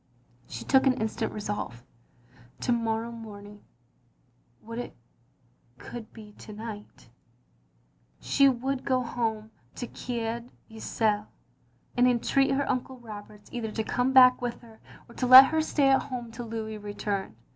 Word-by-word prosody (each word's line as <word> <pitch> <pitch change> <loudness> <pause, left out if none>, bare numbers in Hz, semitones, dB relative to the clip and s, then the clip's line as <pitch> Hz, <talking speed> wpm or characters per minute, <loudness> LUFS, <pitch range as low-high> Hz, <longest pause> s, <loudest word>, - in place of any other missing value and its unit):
She - - -7
took 265 0 +4
an 255 - +4
instant 220 0 -2
resolve. 205 - -5 0.8
To - - 0
morrow 230 0 0
morn 215 -3 -9
ing 205 0 -14 0.5
— 120 - -35
^would 230 +1 -6
it 245 - -6 0.8
could 225 - -9
be 215 -2 -12
to - - -10
night 210 - -9 0.6
— - - -39
she 275 0 +6
would 265 +1 -2
go 255 -1 +1
home 220 -2 -3 0.2
to 245 - -4
Coed 235 0 -4 0.2
Ithel, 215 -1 -1 0.7
and 250 0 +4
entreat 270 +3 +2
her 275 +1 0
Uncle 255 0 -2
Roberts 210 -3 -11
either 235 -3 -3
to 220 +1 -3
come 250 +3 0
back 255 -1 +7
with 245 -1 -4
her, 225 -2 -16 0.3
or 235 - -15
to 250 - -2
let 260 +2 +12
her 320 - +3
stay 290 -3 +2
at 270 - +4
home 245 -4 -6
till 235 +1 -7
Louis 220 -1 -5
returned. 205 - -4
230 Hz, 155 wpm, -28 LUFS, 210-250 Hz, 0.8 s, let